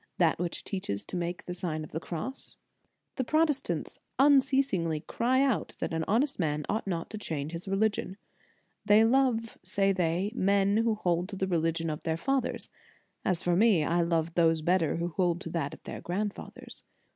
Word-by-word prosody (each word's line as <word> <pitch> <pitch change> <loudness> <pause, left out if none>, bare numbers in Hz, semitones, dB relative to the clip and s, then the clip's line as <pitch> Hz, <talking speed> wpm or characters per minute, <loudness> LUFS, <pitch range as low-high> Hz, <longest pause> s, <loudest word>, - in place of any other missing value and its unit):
That 165 -3 +3
which 175 -1 -3
teaches 145 - -4
to - - -7
make 175 0 -3
the 180 - -4
Sign 165 -3 -3
of 155 - -10
the 160 - -3
Cross? 175 +11 -5 0.6
The 260 - +1
Protestants 275 - 0 0.2
unceasingly 265 - +3
cry 255 - +1
out 245 - 0
that - - -3
an 160 0 0
honest 260 +6 +1
man 150 -3 -1
ought 215 0 -2
not 170 -3 -3
to 215 - -5
change 155 -6 -4
his 170 +3 -7
reli 200 +3 +2
gion. 190 - -5 0.7
They 210 +1 +6
love, 235 -2 +1
say 195 +2 +2
they, 180 +2 0
men 200 -1 +2
who 225 -1 +2
hold 175 -2 0
to 205 - -6
the 190 - -1
religion 165 -2 0
of 150 - -5
their 160 -1 -1
fathers; 270 +7 -1 0.6
as 180 -3 0
for 175 -1 +2
me, 200 -5 +4
I 170 +3 +1
love 165 -1 0
those 165 -2 +3
better 175 -1 +2
who 170 +1 -2
hold 175 0 0
to 165 - -6
that 160 -4 -2
of - - -12
their - - -7
grand 200 +4 -2
fathers. - - -11
180 Hz, 190 wpm, -29 LUFS, 165-220 Hz, 0.7 s, They